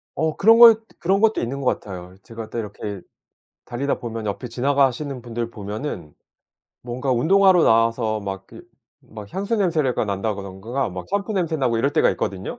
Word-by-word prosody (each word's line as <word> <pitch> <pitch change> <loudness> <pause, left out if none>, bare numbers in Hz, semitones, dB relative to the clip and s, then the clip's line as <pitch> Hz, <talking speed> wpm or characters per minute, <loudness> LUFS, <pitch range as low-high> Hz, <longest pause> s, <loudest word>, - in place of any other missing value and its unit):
어 160 -1 -1
그런 225 +3 +6
것 230 -2 +9 0.2
그런 195 +3 +1
것도 220 0 +3
있는 135 +4 -3
것 125 - 0
같아요. 90 -2 -9
제가 115 0 -9
또 - - -5
이렇게 105 -2 -6 0.7
달리다 135 +3 -2
보면 115 -2 -5
옆에 105 +4 -4
지나가시는 135 +1 0
분들 115 -1 -4
보면은 105 - -6 0.7
뭔가 125 +2 -3
운동하러 185 +7 +4
나와서 115 -1 +2
막 95 -1 -6
그 - - -13 0.4
막 105 -2 -11
향수 200 +4 -1
냄새를 160 -10 +1
가 - - -1
난다든가 100 +4 -3 0.2
샴푸 200 +1 -1
냄새나고 155 -10 0
이럴 140 +5 +1
때가 - - +3
있거든요. 95 -1 -4
120 Hz, 350 characters per minute, -22 LUFS, 105-155 Hz, 0.7 s, 것